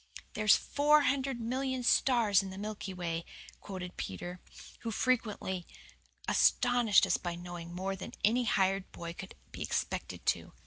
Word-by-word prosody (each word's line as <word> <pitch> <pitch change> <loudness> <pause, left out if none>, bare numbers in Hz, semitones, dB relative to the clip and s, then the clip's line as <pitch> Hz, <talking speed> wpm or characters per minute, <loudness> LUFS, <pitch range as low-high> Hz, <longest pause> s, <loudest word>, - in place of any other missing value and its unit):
"There's 215 -1 +5
four 295 +1 +3
hundred 265 -2 0
million 260 +2 -2
stars 235 -5 +4
in 195 - -6
the 190 - -8
Milky 205 -1 -5
Way," 170 -2 -3 0.4
quoth 185 -3 -7
Peter, 175 - -5 0.4
who 230 - -4
frequently 210 -6 -1 0.6
astonished 245 -4 +4
us - - +2
by 175 -2 -4
knowing 175 -1 -8
more 190 +2 -2
than 190 - -8
any 240 +3 +3
hired 195 -2 +1
boy 170 0 -6
could 190 +2 -9 0.2
be - - -8
expected - - -3
to. - - 0
200 Hz, 145 wpm, -32 LUFS, 180-245 Hz, 0.6 s, There's